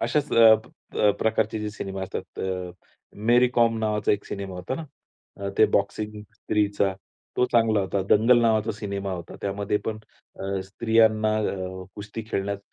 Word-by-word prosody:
अशाच 140 +5 0
अ, 115 -1 +8 0.4
प - - -9
अ, 105 - +5
प्रकारचे 110 0 +1
जे 105 0 -3
सिनेमा 95 -2 -5
असतात 95 0 -6
अ, 90 -1 -3 0.6
मेरी 125 +1 +6
कॉम 115 -1 +3
नावाचा 105 -1 +1
एक 105 - -2
सिनेमा 100 -2 -5
होता 90 +8 -4
ना. 160 - -5 0.5
अ, 100 0 -4
ते 110 - +7
बॉक्सिंग 105 +1 -2
स्त्रीचा. 100 -3 0 0.4
तो 125 - +4
चांगला 115 -3 +4
होता. 95 0 -1
दंगल 120 +3 +6
नावाचा 110 -1 +2
सिनेमा 100 -2 -4
होता. 85 -1 -7
त्यामध्ये 100 +1 -1
पण 110 -1 -2 0.4
अ, 95 0 -2
स्त्रियांना 110 +1 +2
अ, 95 -3 -3
कुस्ती 105 +2 -6
खेळण्यास 100 +1 -1
105 Hz, 160 wpm, -25 LUFS, 100-110 Hz, 0.6 s, अ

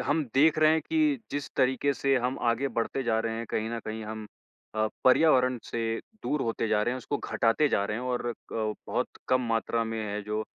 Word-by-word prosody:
हम 150 +1 +2
देख 155 +3 +5
रहे 155 0 +6
हैं 160 - +2
कि 310 -3 +2
जिस 145 0 -3
तरीके 130 +2 +2
से 135 0 +1
हम 125 +1 -1
आगे 125 +4 0
बढ़ते 125 +4 -1
जा 115 -3 +1
रहे 115 0 -2
हैं, 115 +1 -4
कहीं 110 +1 -1
न 115 - -2
कहीं 110 0 -5
हम 110 0 -6 0.5
अ, 110 0 +2 0.2
पर्यावरण 130 -2 +5
से 115 -1 -2 0.2
दूर 150 - -1
होते 115 -1 -1
जा 105 0 +2
रहे 120 - 0
हैं, 130 - -3
उसको 140 +3 -3
घटाते 115 +7 +2
जा 100 - +1
रहे 105 +1 -2
हैं 125 - -5
और 125 -1 -2
अ, - - -1 0.2
बहुत 110 -1 -2 0.2
कम 130 - +4
मात्रा 115 0 0
में 115 0 -3
है 105 0 -3
जो 105 +1 -2
120 Hz, 220 wpm, -28 LUFS, 110-140 Hz, 0.5 s, रहे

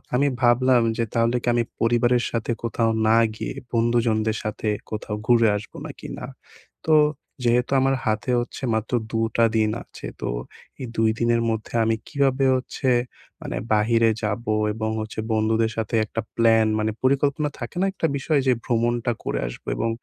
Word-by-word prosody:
আমি 140 +3 +3
ভাবলাম 125 0 +4
যে 115 - +1
তাহলে 115 +1 +2
কি - - -6
আমি 120 0 +2 0.2
পরিবারের 120 +1 +3
সাথে 115 0 -2
কোথাও 115 0 +1 0.2
না 110 +1 +5 0.2
গিয়ে, - - -4 0.2
বন্ধুজনদের 115 -2 +1
সাথে 105 +1 -4 0.2
কোথাও 105 -1 -4
ঘুরে 115 -2 +5
আসবো? 105 - -10
নাকি - - -9
না? - - -5 0.6
তো 160 - +3 0.5
যেহেতু 120 +1 +2
আমার 135 0 +2
হাতে 110 +3 -1
হচ্ছে 120 +3 -6
মাত্র 110 +2 -3 0.2
২ 115 - 0 0.2
টা 115 - +5
দিন 110 -1 +3
আছে। - - -12 0.2
তো - - -2 0.5
এই 130 - -4
২ 110 0 +3
দিনের 115 0 +2
মধ্যে, 110 -1 -4
আমি 115 0 +2
কিভাবে 135 -1 +1
হচ্ছে 130 +1 -3 0.5
মানে - - -4 0.2
বাহিরে 115 +2 +3
যাবো? 110 +2 -1 0.2
এবং 110 0 -2
হচ্ছে 110 0 -6
বন্ধুদের 110 +1 +1
সাথে 115 0 -2
একটা 115 +1 -4
প্ল্যান 115 -1 +4
মানে 110 0 0
পরিকল্পনা 140 +2 +2
থাকে 120 - -7
না - - +3
একটা 165 - 0
বিষয়? 145 +2 +1
যে 130 - +5
ভ্রমণটা 120 0 +1
করে - - -2
আসবো। - - -10
এবং 115 - 0
115 Hz, 170 wpm, -23 LUFS, 110-125 Hz, 0.6 s, না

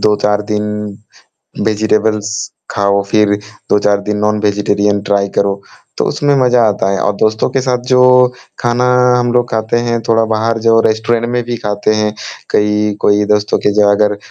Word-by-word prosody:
2-4 105 0 +1
दिन 105 0 -2 0.9
वेजिटेब्लस 110 0 0 0.3
खाओ 100 0 +1
फिर, 105 -1 +3 0.4
2-4 105 0 +2
दिन 105 - -1
नॉन-वेजिटेरियन 105 -1 0
ट्राई 100 0 0
करो, 100 0 0 0.4
तो - - +1
उसमें 145 -1 0
मज़ा 125 -1 +3
आता 100 -2 -1
है 100 - -1
और 105 - +1
दोस्तों 110 0 +1
के 135 +1 0
साथ 125 -1 -1
जो 125 - +5 0.6
खाना 120 +1 0 0.3
हम 120 -1 0
लोग 120 0 +1
खाते 110 +1 -1
हैं 120 -1 -1
थोड़ा 115 0 +3
बाहर 115 +1 0
जो 115 0 +5
रेस्टोरेंट 110 +2 0
में 120 0 -1
भी 120 0 -4
खाते 105 +1 -1
हैं 105 0 0 0.4
कई 105 0 +1
कोई 105 0 +2
दोस्तों 105 0 +1
के 105 - +2
जो 105 -1 +3
अगर 105 0 +1
105 Hz, 165 wpm, -14 LUFS, 105-115 Hz, 0.9 s, जो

